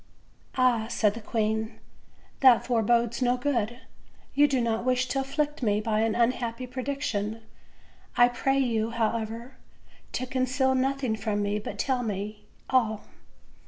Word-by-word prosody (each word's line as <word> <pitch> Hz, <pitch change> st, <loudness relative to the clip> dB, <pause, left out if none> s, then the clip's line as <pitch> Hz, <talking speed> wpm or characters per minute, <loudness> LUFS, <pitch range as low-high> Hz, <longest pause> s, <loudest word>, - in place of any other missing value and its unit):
"Ah!" 245 Hz, -4 st, +3 dB
said 210 Hz, -3 st, +1 dB
the 230 Hz, -, -8 dB
queen, 220 Hz, 0 st, -1 dB, 0.6 s
"that 260 Hz, -3 st, +6 dB
forebodes 235 Hz, 0 st, +1 dB
no 250 Hz, 0 st, +2 dB
good; 240 Hz, -3 st, -1 dB, 0.5 s
you 290 Hz, +1 st, +5 dB
do 270 Hz, -2 st, +1 dB
not 230 Hz, -1 st, 0 dB
wish 255 Hz, 0 st, +2 dB
to 270 Hz, -, 0 dB
afflict 295 Hz, +2 st, -2 dB
me 210 Hz, -3 st, +2 dB
by 215 Hz, 0 st, 0 dB
an 225 Hz, 0 st, +1 dB
unhappy 240 Hz, 0 st, 0 dB
prediction; 245 Hz, -5 st, -3 dB, 0.7 s
I 245 Hz, -, +7 dB
pray 270 Hz, +2 st, 0 dB
you 230 Hz, -4 st, +1 dB
however, 230 Hz, +2 st, -2 dB, 0.6 s
to 255 Hz, -, -2 dB
conceal 260 Hz, +1 st, +1 dB
nothing 260 Hz, -2 st, 0 dB
from 210 Hz, -1 st, -1 dB
me, 205 Hz, +1 st, -1 dB
but 210 Hz, -, -7 dB
tell 260 Hz, -2 st, 0 dB
me 210 Hz, -1 st, -4 dB, 0.2 s
all." 220 Hz, -5 st, +1 dB
235 Hz, 140 wpm, -27 LUFS, 220-255 Hz, 0.7 s, I